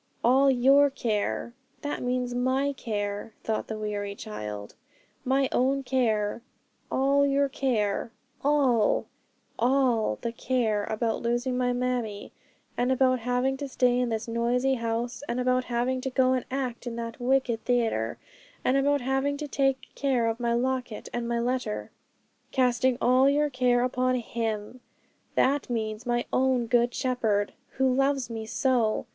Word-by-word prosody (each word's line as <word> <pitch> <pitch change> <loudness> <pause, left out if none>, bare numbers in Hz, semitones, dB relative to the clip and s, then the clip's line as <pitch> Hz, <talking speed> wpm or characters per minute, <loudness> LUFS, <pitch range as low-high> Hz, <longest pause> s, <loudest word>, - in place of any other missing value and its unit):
'"All 265 +3 +5
your 270 +3 +5
care," 235 -2 -2 0.3
that 290 - -3
means 250 0 -1
my 260 +3 +1
care,' 205 -3 -4
thought 220 -1 -2
the 220 - -4
weary 205 -1 -3
child, 105 - -7 0.5
'my 270 +1 +2
own 270 +2 +1
care. 235 -5 0 0.5
"All 275 +1 +3
your 280 0 +2
care;" 235 -6 -1 0.3
all 270 -7 +3 0.5
all 240 - +2
the 235 - -1
care 230 -4 0
about 225 +1 -1
losing 240 +2 0
my 250 0 +1
mammie, 245 -4 -2 0.4
and 245 +1 +1
about 255 -1 +3
having 250 +3 0
to 285 0 -4
stay 250 -2 +2
in 250 -1 0
this 225 0 -3
noisy 240 +3 +1
house, 235 0 -2
and 240 - -1
about 255 0 +1
having 250 +2 -1
to 265 - -2
go 260 0 +3
and 255 - -1
act 255 -2 -3
in 235 - -4
that 230 0 -5
wicked 250 -2 +1
theatre, 225 - 0 0.5
and 260 - +3
about 285 0 +2
having 270 +3 0
to 300 0 -5
take 270 -2 0
care 260 -4 +1
of 225 +1 -1
my 235 -1 0
locket 255 -2 -2
and 240 -1 -2
my 235 0 0
letter. 240 -2 -2 0.6
'"Casting 255 -1 +2
all 255 +2 +4
your 295 +1 +2
care 250 -1 +2
upon 255 0 +1
Him" 225 -1 -3 0.6
that 275 +1 +2
means 220 0 -3
my 240 0 0
own 255 -2 +2
Good 240 +1 +2
Shepherd, 225 -6 0 0.2
who 265 -1 +2
loves 270 -2 +1
me 220 -1 -5
so. 235 -2 +1
250 Hz, 150 wpm, -27 LUFS, 230-260 Hz, 0.6 s, All